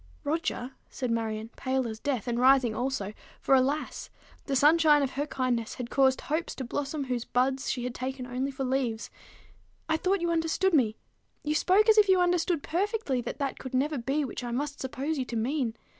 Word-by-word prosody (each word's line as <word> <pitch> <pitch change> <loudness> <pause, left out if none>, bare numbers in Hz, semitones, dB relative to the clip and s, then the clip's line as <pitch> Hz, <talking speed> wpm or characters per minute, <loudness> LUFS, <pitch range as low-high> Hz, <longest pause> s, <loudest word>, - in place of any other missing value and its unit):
"Roger," 295 -4 -2 0.2
said 250 -3 -3
Marion, 225 -1 -2
pale 260 -1 -1
as 220 -1 -6
death, 255 -6 -2
and 240 0 0
rising 255 -2 +5
also; 225 -4 -2 0.3
for, - - +2
alas! 270 +3 +1 0.4
the 275 - 0
sunshine 300 +1 +5
of 270 - -1
her 290 +2 -2
kindness 250 -5 -1
had 245 -1 -6
caused 265 -1 +3
hopes 315 +3 -2
to 265 - -5
blossom 285 +4 -3
whose 250 -3 -2
buds 260 +2 0
she 245 - -2
had 250 0 -3
taken 255 0 -4
only 250 +2 -2
for 270 0 -4
leaves, 250 -4 -1 0.8
"I 320 0 +2
thought 375 +3 0
you 340 0 0
understood 335 +3 +1
me! 230 -8 +3 0.5
You 300 0 0
spoke 380 +7 +4
as 440 -1 +7
if 410 -2 +4
you 375 -1 +5
understood 355 -3 +1
perfectly 365 - -1
that - - -5
that 275 -2 -3
could 260 -1 -5
never 285 +2 +1
be 275 +5 0
which 255 - -6
I 240 - -4
must 285 +4 -3
suppose 270 +4 -3
you 260 - -1
to 240 - -6
mean. 240 0 -1
270 Hz, 200 wpm, -28 LUFS, 250-310 Hz, 0.8 s, as